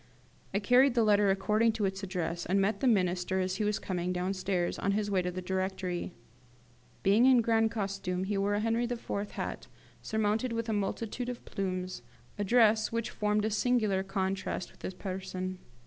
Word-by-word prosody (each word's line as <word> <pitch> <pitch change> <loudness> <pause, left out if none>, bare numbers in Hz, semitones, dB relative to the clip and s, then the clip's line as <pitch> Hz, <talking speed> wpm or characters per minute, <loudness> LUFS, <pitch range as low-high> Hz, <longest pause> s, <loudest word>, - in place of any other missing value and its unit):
I 195 - 0
carried 250 +5 +4
the 235 - +4
letter 205 -1 +4
according 215 +4 +2
to 215 -2 -1
its 195 0 -2
address, 175 -3 -3
and 195 +2 +2
met 200 +1 +1
the 265 - +1
Minister 185 -3 +2
as 185 0 -1
he 215 - 0
was 210 0 +1
coming 180 -1 -2
downstairs, 180 0 -1
on 200 - +1
his 205 0 -1
way 190 -2 +2
to 180 - -2
the 185 +1 -5
Directory. 185 -1 -2 0.9
Being 210 +6 +5
in 255 -2 +6
grand 225 -1 +3
costume, 195 -4 -2
he 200 +2 -1
wore 200 +1 +1
a 205 - 0
Henri 230 +2 +1
IV. 240 -1 -5 0.2
hat, - - -5 0.3
surmounted 220 +3 0
with 230 0 -2
a 220 - 0
multitude 225 +4 -2
of 245 - -7
plumes, 185 -3 -3 0.4
a - - +1
dress 220 0 +4
which 230 0 -2
formed 210 0 0
a 220 - 0
singular 215 -3 +2
contrast 190 -1 -2
with - - -22
his 185 - -5
person. 185 -1 -5
200 Hz, 185 wpm, -30 LUFS, 185-220 Hz, 0.9 s, in